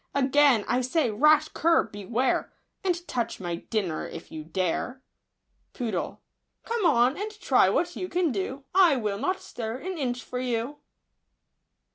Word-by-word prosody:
Again 275 -4 +4
I 250 +1 +2
say, 255 0 +1
rash 305 +7 +4
cur, 335 +1 +3
beware. 220 +5 -1 0.3
And 350 -2 -1
touch 235 -2 -2
my 175 -2 -3
dinner 185 -4 -2
if 165 - -10
you 155 -1 -6
dare! 185 +10 -2 0.7
Poodle. 220 -9 -3 0.4
Come 455 -5 +1
on, 250 -2 +4
and 415 +2 -3
try - - +4
what 350 0 0
you 365 - -4
can 350 -3 +1
do; 255 +6 -3
I 360 -6 +6
will 210 -5 -2
not 370 - 0
stir 225 0 -5
an 365 +4 -5
inch 250 -3 -2
for 250 - -5
you. 250 +3 -2
255 Hz, 150 wpm, -27 LUFS, 220-310 Hz, 0.7 s, I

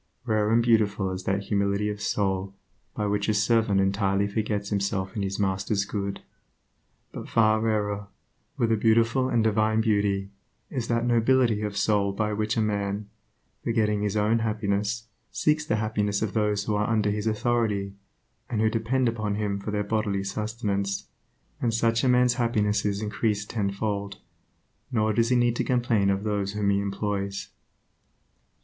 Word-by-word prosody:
Rare 110 -3 +1
and 115 +1 +4
beautiful 105 -4 +2
is 95 0 -5
that 100 +1 0
humility 100 0 0
of 105 -1 -4
soul 95 -1 -1 0.4
by 105 - -1
which 100 0 0
a 105 - +2
servant 105 -1 +2
entirely 100 0 +1
forgets 105 -1 -2
himself 100 -1 -1
in 105 - -2
his 95 0 -2
master's 100 +1 0
good; 100 -1 -4 0.9
but - - -8
far 110 -1 +3
rarer, 105 -2 -1 0.5
and 115 -2 +2
beautiful 115 +4 +3
with 130 -2 -1
a - - +3
divine 110 0 +2
beauty, 100 -3 +1 0.4
is 125 -4 -3
that 115 0 0
nobility 120 -2 +3
of 105 -1 -3
soul 100 -2 +2
by 105 +1 -1
which 110 +2 -1
a - - +3
man, 100 -1 -2 0.5
forgetting 105 -3 +1
his 105 0 -1
own 110 +2 +2
happiness, 105 0 -1 0.3
seeks 150 0 +1
the 110 - +1
happiness 105 -1 0
of 105 - -2
those 105 -2 +1
who 105 - -1
are 105 +1 0
under 105 -2 +2
his 105 +1 -2
authority, 110 -3 0 0.6
and 115 - -1
who 110 0 +3
depend 120 +3 +1
upon 110 -3 -1
him 105 -1 -1
for 100 - -6
their 105 0 -1
bodily 100 -2 -1
sustenance. 100 -1 -2 0.6
And 120 - +1
such 115 0 +1
a 130 - +3
man's 125 0 +4
happiness 105 -4 +1
is 100 +1 -1
increased 105 -1 -1
tenfold, 100 -1 -2 0.7
nor 110 -2 +1
does 115 +2 +2
he 125 - +3
need 120 -1 +3
to - - +1
complain 120 -5 +1
of 100 +1 0
those 100 -2 -1
whom 105 -1 +1
he 100 - +2
employs. 100 -1 -3
105 Hz, 165 wpm, -26 LUFS, 100-115 Hz, 0.9 s, and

